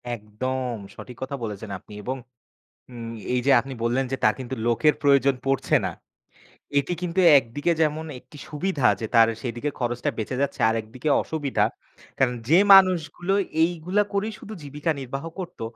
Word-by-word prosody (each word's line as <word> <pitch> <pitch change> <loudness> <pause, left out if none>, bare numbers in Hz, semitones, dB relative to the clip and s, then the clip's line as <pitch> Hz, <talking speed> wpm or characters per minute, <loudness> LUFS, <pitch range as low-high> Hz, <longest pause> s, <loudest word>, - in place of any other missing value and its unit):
একদম, 125 +4 -4 0.2
সঠিক 125 -2 -10
কথা 130 +1 -3
বলেছেন 105 -1 -5
আপনি। 105 - -15
এবং 130 +4 -3 0.7
উম 115 -2 -7 0.2
এই 125 - +2
যে 140 - +4
আপনি 135 +3 -6
বললেন 125 +3 +1
যে, 135 - -1
তার 110 - +5
কিন্তু 130 0 -5
লোকের 120 +6 +3
প্রয়োজন 140 -1 +4
পড়ছে 135 0 +1
না। - - -2 0.9
এটি 140 +5 -1
কিন্তু 180 +1 0 0.2
একদিকে 140 +7 -1
যেমন 155 +1 0
একটি 150 - -16
সুবিধা 150 -2 -2
আছে 100 +3 -4
,তার 115 -1 +7
সেদিকে 120 +3 -3
খরচটা 120 -1 -1
বেঁচে 115 +4 -3
যাচ্ছে 140 - -2
আর 110 - +1
একদিকে 120 +7 -5
অসুবিধা। 140 -9 -1 0.5
কারণ 125 -2 +2
যে 165 +4 +6 0.2
মানুষগুলো 185 0 +3 0.3
এইগুলা 175 +4 +1
করেই 205 +2 -1
শুধু 215 - -10
জীবিকা 145 +3 -3
নির্বাহ 135 +3 -5
করত, 180 -2 -7
135 Hz, 160 wpm, -24 LUFS, 120-155 Hz, 0.9 s, তার